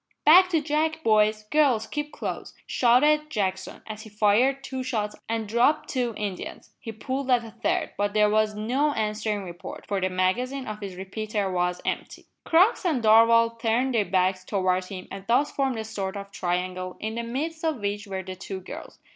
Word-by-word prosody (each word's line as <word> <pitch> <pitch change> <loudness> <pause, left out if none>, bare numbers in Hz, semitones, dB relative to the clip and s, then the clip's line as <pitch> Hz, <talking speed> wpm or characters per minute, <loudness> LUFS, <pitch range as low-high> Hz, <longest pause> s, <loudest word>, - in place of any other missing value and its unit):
"Back 365 +4 +8
to 325 -4 +1
back, 315 +2 0
boys! 215 -1 +3
girls, 275 -8 +3
keep 295 +6 -4
close!" - - -6
shouted 300 +5 +3
Jackson, 190 -6 -3
as 215 -1 -7
he 220 - -11
fired 220 +6 +2
two 260 -1 -4
shots 215 -5 -2
and 225 -1 -2
dropped 240 +8 +2
two 245 -4 -1
Indians. 200 -3 -6
He 225 - -7
pulled 260 +5 -4
at 245 -2 +4
a 225 - -10
third, - - -1
but 205 +1 0
there 210 0 +5
was 215 0 +1
no 260 +8 0
answering 215 -2 -2
report, 175 -2 -9
for 200 -2 -2
the 185 - +1
magazine 245 +9 -1
of 215 -2 -6
his 195 -2 -6
repeater 200 +1 -3
was 180 0 -1
empty. - - -4 0.2
Crux 365 +8 +4
and 305 -10 0
Darvall 230 +1 +5
turned 240 +4 +1
their 225 -3 +3
backs 185 0 +1
towards 185 -1 0
him 185 -2 -8
and 195 0 -7
thus 265 +5 +2
formed 270 -3 -1
a 220 - -3
sort 200 -3 -4
of 200 0 -8
triangle, 185 0 -3
in 220 +1 -3
the 235 - -3
midst 300 +8 -4
of 315 -6 0
which 205 0 -3
were 190 -1 -4
the 185 0 -7
two 190 +1 -6
girls. 185 - -9
220 Hz, 190 wpm, -26 LUFS, 195-260 Hz, 0.2 s, Back